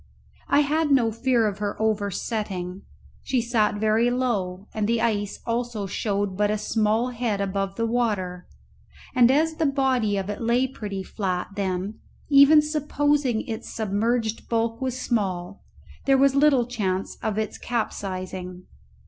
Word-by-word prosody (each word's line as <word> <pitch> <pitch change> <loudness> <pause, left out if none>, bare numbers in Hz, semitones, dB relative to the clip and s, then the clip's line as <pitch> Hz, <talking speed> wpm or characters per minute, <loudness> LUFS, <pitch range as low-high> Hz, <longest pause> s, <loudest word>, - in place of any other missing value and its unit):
I 285 - +4
had 305 +2 +1
no 250 -5 +4
fear 235 0 +1
of 205 -1 -2
her 205 -1 -3
oversetting; 205 -3 -2 0.4
she 260 - 0
sat 230 -3 +1
very 220 +3 +2
low, 205 -7 -1
and 215 -1 -1
the 235 0 +1
ice 205 -3 -1
also 235 -3 -2
showed 200 0 -2
but 205 +1 +1
a 210 - +1
small 220 +3 +1
head 235 -4 -2
above 195 0 -2
the 230 - 0
water, 205 -7 -1 0.7
and 245 -1 +5
as 315 +4 +3
the 320 - +2
body 260 -7 +1
of 195 -1 -2
it 205 +2 -5
lay 235 +3 +2
pretty 205 -7 -5
flat, 185 -3 -3
then, 195 +1 -2 0.3
even 290 +2 +7
supposing 290 -4 +1
its 220 -1 -5
submerged 220 +2 -1
bulk 230 0 0
was 255 -1 -2
small, 195 -6 -2 0.5
there 270 0 +5
was 275 0 +4
little 280 -3 +4
chance 195 -6 -2
of 215 -1 -2
its 220 -1 -3
capsizing. 185 -5 -4
220 Hz, 150 wpm, -25 LUFS, 200-250 Hz, 0.7 s, even